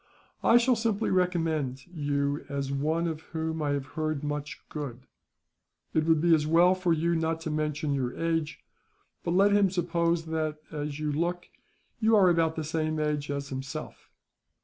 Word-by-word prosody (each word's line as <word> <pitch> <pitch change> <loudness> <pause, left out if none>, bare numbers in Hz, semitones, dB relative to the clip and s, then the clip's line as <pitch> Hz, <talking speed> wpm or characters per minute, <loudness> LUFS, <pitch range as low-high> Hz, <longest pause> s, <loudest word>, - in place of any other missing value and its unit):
I 235 - +6
shall 245 +1 +4
simply 225 -2 0
recommend 165 -8 0
you 145 -3 -1
as 140 -1 -2
one 155 +5 0
of 160 -1 -4 0.2
whom 160 0 -2
I 150 - 0
have 140 -1 -2
heard 155 -2 -2
much 145 0 -4
good. 130 -4 -6 0.9
It 155 -1 +2
would 160 -1 +4
be 170 +1 +4
as 150 -1 +3
well 170 +3 +5
for 185 -2 0
you 165 +1 +2
not 165 0 0
to 160 - -3
mention 150 -1 -1
your 125 -3 -2
age; 165 -2 -1 0.6
but - - -2
let 200 +2 +5
him 200 -1 +4
suppose 170 -2 0
that, 155 -1 -2
as 150 -1 -4
you 150 -1 -1
look, 175 +4 -2 0.5
you 220 0 +4
are 195 -3 +6
about 165 -1 +2
the 160 - -3
same 155 0 -1
age 150 -1 -1
as 140 0 -3
himself. 135 0 -6
160 Hz, 170 wpm, -28 LUFS, 145-170 Hz, 0.9 s, I